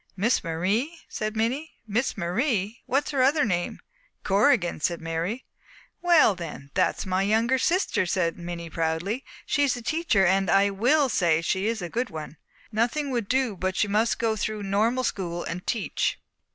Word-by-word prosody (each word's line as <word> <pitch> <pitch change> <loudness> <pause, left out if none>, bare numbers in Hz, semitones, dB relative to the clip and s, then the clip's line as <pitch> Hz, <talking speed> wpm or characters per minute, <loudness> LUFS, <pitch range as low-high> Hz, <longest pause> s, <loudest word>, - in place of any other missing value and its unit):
"Miss 220 +6 +2
Marie?" 200 - -1
said 215 0 -3
Minnie. 260 +8 -1
"Miss 225 +4 -1
Marie? 205 - -1
What 275 +3 +2
is - - -4
her 275 -3 +1
other 285 +3 +4
name?" 175 -4 -1 0.4
"Corrigan," 195 - +3
said 170 +2 -1
Mary. 165 +9 -3 0.6
"Well, 340 - +5
then, 160 -6 -8
that's - - +1
my 185 0 0
younger 225 +6 +2
sister," 290 - +1
said 170 -2 0
Minnie 170 -1 -6
proudly. 165 - -1 0.2
"She's 285 -3 +1
a - - -7
teacher, 310 - +2
and 190 0 +2
I 200 +2 +4
will 260 +9 +3
say 170 -8 +2
she 190 +4 0
is 225 -4 -2
a - - -3
good 235 +8 -2
one. 155 0 -8 0.3
Nothing 245 +6 0
would 235 -5 -1
do 260 -5 +1
but 185 +1 -2
she 210 - +2
must 215 +3 +1
go 225 -1 0
through 215 -1 -3
normal 220 +6 +1
school 175 -7 -2
and 180 +2 -6
teach. 225 -4 -1
210 Hz, 170 wpm, -26 LUFS, 175-250 Hz, 0.6 s, Well